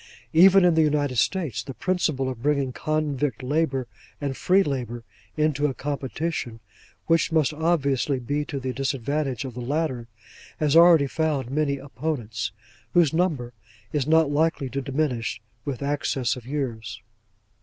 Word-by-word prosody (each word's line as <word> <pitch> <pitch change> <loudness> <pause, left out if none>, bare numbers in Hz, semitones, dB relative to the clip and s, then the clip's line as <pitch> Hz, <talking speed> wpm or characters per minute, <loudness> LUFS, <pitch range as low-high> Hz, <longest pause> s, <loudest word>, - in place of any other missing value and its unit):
Even 185 +3 +7
in 175 - +5
the 160 - +4
United 145 -4 +1
States, 160 - 0
the 135 - -8
principle 160 -8 0
of 125 -3 -5
bringing 140 -2 +1
convict 145 -5 -1
labour 135 -1 0 0.3
and 140 -2 -3
free 190 +7 +3
labour 120 - -4 0.3
into 150 -1 +2
a 135 - -3
competition 140 -3 -3 0.5
which 165 0 +2
must 155 -2 +2
obviously 145 -4 +1
be 145 +4 -2
to 140 -2 -4
the 130 -1 -3
disadvantage 135 0 -2
of 130 - -6
the 125 - -6
latter, 130 -2 -2 0.5
has 150 -1 +2
already 165 -3 +7
found 140 -3 -1
many 140 -1 0
opponents, 125 -6 -4 0.4
whose 170 -4 +4
number 155 -9 0 0.4
is 145 -2 0
not 160 -2 +4
likely 145 -3 +1
to 140 - -2
diminish 135 -4 -1 0.3
with 140 -2 -4
access 140 -3 0
of 125 -2 -11
years. 115 -7 -4
140 Hz, 145 wpm, -25 LUFS, 130-155 Hz, 0.5 s, Even